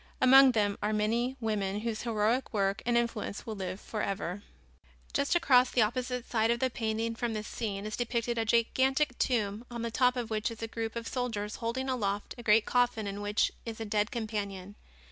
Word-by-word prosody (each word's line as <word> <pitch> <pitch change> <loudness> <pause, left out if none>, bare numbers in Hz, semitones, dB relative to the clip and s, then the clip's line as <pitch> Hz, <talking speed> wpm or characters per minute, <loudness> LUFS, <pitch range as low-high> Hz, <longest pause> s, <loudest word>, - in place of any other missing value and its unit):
Among 265 0 +7
them 205 -3 +1
are 210 +1 0
many 235 +5 0
women 210 -3 -1
whose 225 -1 -3
heroic 230 +2 0
work 195 -1 +1
and 240 -1 +3
influence 230 -3 -2
will 225 - -4
live 190 -2 -5
forever. 200 -3 -3 0.7
Just 280 +4 +1
across 260 -7 +5
on - - -10
the 240 - +6
opposite 250 +2 -2
side 225 -1 +1
of 235 0 +2
the 260 0 +1
painting 225 0 -1
from 230 0 -2
this 215 0 -4
scene 205 -3 -4
is 215 - -3
depicted 235 -1 -1
a - - +2
gigantic 260 +4 +2
tomb 215 -3 0
on 235 -1 -5
the 230 - -2
top 250 +2 +3
of 240 -2 -4
which 215 -1 0
is 230 0 -8
a - - -2
group 225 0 -4
of 230 -1 -4
soldiers 225 -5 -3
holding 250 +3 -2
aloft 205 -6 -2
a - - -5
great 225 -1 +4
coffin 245 -3 +1
in 200 0 -4
which 205 +1 +1
is 230 -1 -6
a 225 - -3
dead 210 0 0
companion. 205 -4 -4
225 Hz, 200 wpm, -30 LUFS, 210-245 Hz, 0.7 s, Among